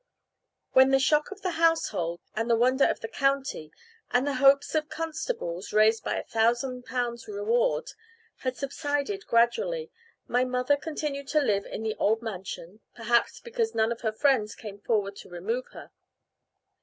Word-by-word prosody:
When 260 0 +6
the 270 - +5
shock 300 +3 +2
of 405 0 -10
the 350 -3 -2
household, 175 - +1
and 225 +2 -1
the 230 - +5
wonder 255 +4 +4
of - - 0
the 225 - -4
county, 275 - -1 0.4
and 250 +2 +2
the 285 - 0
hopes 275 +1 +5
of 310 -1 0
constables 315 - -4
(raised 215 +1 +4
by - - -1
a - - -3
thousand 240 +3 0
pounds' 240 -2 -3
reward) 455 +4 0 0.5
had 255 -1 -3
subsided 290 +7 -2
gradually, 465 - +1 0.4
my 250 +1 +2
mother 250 +2 +1
continued 285 -2 -4
to 305 +3 +2
live 205 -8 +1
in 220 - -6
the 220 -1 -1
old 220 +2 +2
mansion, 195 -2 -7 0.2
perhaps 235 0 +1
because 465 -1 -2
none 220 +1 +2
of 235 - -4
her 220 -2 0
friends 220 -3 +1
came 205 -2 -9
forward 205 -2 0
to - - -11
remove 215 +9 -3
her. - - -12
255 Hz, 165 wpm, -27 LUFS, 220-300 Hz, 0.5 s, When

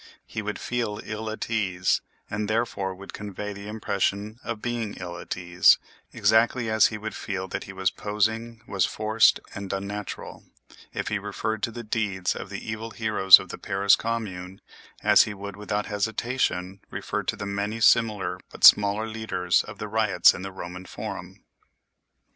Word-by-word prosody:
He 110 - -5
would 105 0 -4
feel 115 -4 -2
ill 110 0 -5
at 110 - -4
ease, 95 -5 +1 0.3
and 105 0 -3
therefore 110 -4 -1
would 100 +1 -11
convey 105 0 -6
the 100 +1 -9
impression 105 0 -2
of 115 -2 -4
being 115 -2 -3
ill 90 -2 -6
at - - -5
ease, 90 0 +5 0.3
exactly 110 +2 +2
as 110 -1 +6
he 110 - -5
would 110 0 -5
feel 95 -1 -4
that - - -4
he - - -8
was 95 -1 0
posing, 110 +2 -2
was 95 -3 +1
forced 110 +1 +3
and 100 -1 -6
unnatural, 100 +1 -5 0.5
if - - -3
he - - -1
referred 110 -1 -3
to 115 - -1
the 120 +1 -7
deeds 105 -4 -1
of - - -7
the 100 +1 -7
evil 110 +1 -4
heroes 105 -4 +7
of 95 - -9
the - - -7
Paris 100 0 +3
Commune 95 -5 -4 0.4
as - - +6
he 105 - -6
would 100 0 -7
without 105 0 -2
hesitation 105 -3 -1
refer - - -3
to - - -2
the 100 - -6
many 100 +3 -2
similar 105 -6 +3
but - - -12
smaller 105 +1 +7
leaders 110 -5 0
of - - -10
riots 105 -4 +4
in - - -7
the 95 +1 -6
Roman 90 0 -8
forum. - - -7
105 Hz, 170 wpm, -26 LUFS, 95-110 Hz, 0.5 s, heroes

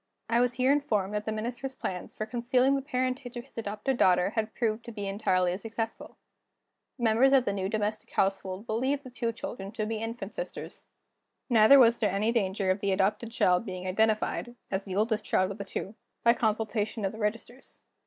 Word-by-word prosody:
I 235 - +4
was 245 0 +2
here 255 +1 +3
informed 210 -9 +1
that 210 0 -2
the 220 - -1
Minister's 245 +5 -4
plans 180 -1 -5
for 215 - -3
concealing 250 +3 +2
the 275 - -1
parentage 255 -2 -2
of 240 - -6
his 270 - -9
adopted 215 +4 -2
daughter 180 -1 +4
had 220 -1 -2
proved 230 -1 -1
to 235 - -7
be 205 -3 -5
entirely 185 -3 +1
successful. 225 +1 -5 0.8
The 240 - -6
members 235 +5 +4
of 260 -2 +5
the 200 - 0
new 190 -1 -2
domestic 215 0 -2
household 195 +1 -1
believed 260 +6 0
the 255 - -10
two 235 -2 -2
children 210 -3 -7
to 215 -1 -2
be 220 +1 -2
infant 225 +2 -5
sisters. - - -7 0.6
Neither 225 +4 +8
was 235 -3 +6
there 210 - +2
any 205 +4 +1
danger 195 -4 +1
of 185 - 0
the 200 0 0
adopted 210 +4 0
child 180 -5 +3
being 185 -3 -6
identified 220 +4 0 0.2
(as 195 0 -2
the 190 -2 -5
oldest 215 +1 +1
child 185 -2 +1
of 200 - -8
the 200 - -4
two) 195 +1 -5 0.3
by 235 - +6
consultation 220 -1 -1
of 190 - 0
the 220 - -10
registers. 230 +4 -4
220 Hz, 200 wpm, -29 LUFS, 200-240 Hz, 0.8 s, Neither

